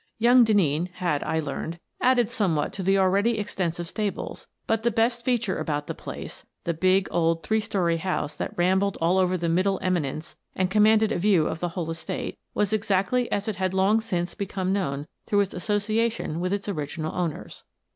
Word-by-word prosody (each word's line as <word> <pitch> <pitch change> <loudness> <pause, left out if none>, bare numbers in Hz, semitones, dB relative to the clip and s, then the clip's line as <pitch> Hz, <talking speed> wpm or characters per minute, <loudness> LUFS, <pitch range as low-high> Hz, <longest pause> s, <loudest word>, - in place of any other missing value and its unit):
Young 245 +2 +6
Denneen 180 -6 +2
had, 170 -6 -1
I 160 - 0
learned, 160 +3 -4 0.2
added 245 -3 +3
somewhat 170 -10 0
to 195 - -4
the 195 +1 +3
already 200 +4 +3
ex 210 - -4
tensive 175 -2 -1
stables, 205 +3 -4 0.2
but 225 -1 +1
the 235 - +2
best 235 +2 +1
feature 235 -6 0
about 145 -2 -2
the - - -4
place - - -8
— - - -54
the 170 - -1
big, 185 +3 +2
old, 165 -1 +1
three 220 +7 +1
story 175 -5 0
house 160 -4 -2
that - - -5
rambled 190 +3 +2
all 175 +3 +3
over 185 0 +2
the 170 -1 -2
middle 185 +4 +2
eminence 165 -4 -2 0.2
and 185 0 0
commanded 215 +1 +4
a 180 - 0
view 185 -4 +3
of 160 - -3
the 175 - -1
whole 165 -2 -2
estate 165 0 -5
— - - -53
was 210 0 +1
exactly 215 +3 +1
as 205 +1 -1
it 215 -4 -2
had 185 0 -1
long 200 +4 +3
since 175 -5 -2
become 190 -1 -2
known 145 -8 -1 0.2
through 205 -1 +3
its 195 - -2
association 210 -2 -1
with 180 +1 -1
its 200 0 -2
original 155 -3 -3
owners. 170 -4 -4
190 Hz, 195 wpm, -25 LUFS, 170-210 Hz, 0.2 s, Young